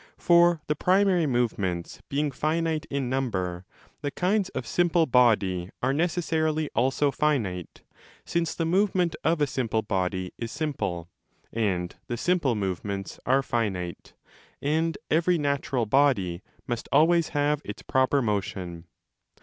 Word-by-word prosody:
For 170 -2 +4
the 150 - +1
primary 185 0 +3
movements 100 -9 -1
being 145 +1 0
finite 155 +3 -1
in 140 -2 -2
number, 95 -9 -2 0.4
the 145 - -1
kinds 185 +6 0
of 130 - -5
simple 175 +3 +2
body 105 - +3
are 130 +2 +2
necessarily 160 -2 0
also 135 +3 +2
finite, 115 - -1 0.4
since 170 -1 -1
the 165 - -1
movement 180 -1 +2
of 165 -1 +1
a - - +5
simple 120 -5 -1
body 95 -2 -2
is 115 -1 -4
simple, 100 - -3 0.4
and 95 -6 -1
the 120 - -3
simple 160 -5 +1
movements 95 0 -4
are 135 +2 +3
finite, 95 -9 -3 0.4
and 160 +3 0
every 170 +2 +3
natural 140 -4 0
body 105 -9 +2 0.2
must 120 -1 -4
5 - - +5
always 170 +1 +3
have 145 0 +1
its - - -8
proper 130 0 +2
motion. 95 -5 -3
135 Hz, 135 wpm, -26 LUFS, 100-160 Hz, 0.4 s, a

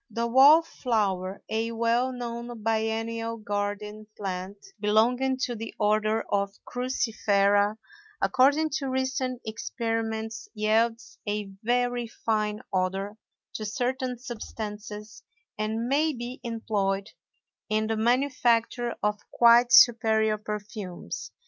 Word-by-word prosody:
The 235 0 -2
wallflower, 235 - +3
a 225 +1 -1
well 235 +3 +1
known 235 -2 -6
biennial 225 +1 -1
garden 210 0 -4
plant 190 0 -4 0.2
belonging 245 +5 +2
to 240 - -1
the 225 0 -7
Order 215 +1 +2
of 200 0 +1 0.2
Cruciferæ, 210 -5 +1 0.4
according 295 -2 +3
to 275 -2 -3
recent 260 -1 -2
experiments 225 -1 -3
yields 225 +2 0
a 205 -1 -2
very 245 +1 0
fine 215 -2 -1
odor 195 +2 -1 0.4
to 215 - -5
certain 250 +3 -2
substances 210 -3 -7 0.3
and 220 +2 -2
may 300 +4 +2
be 245 +1 -6
employed 205 -4 -2 0.6
in 215 0 +1
the 225 0 -1
manufacture 240 0 +1
of 210 0 +1
quite 240 +1 +6
superior 220 -2 +5
perfumes. 210 - -6
225 Hz, 105 wpm, -27 LUFS, 210-240 Hz, 0.6 s, quite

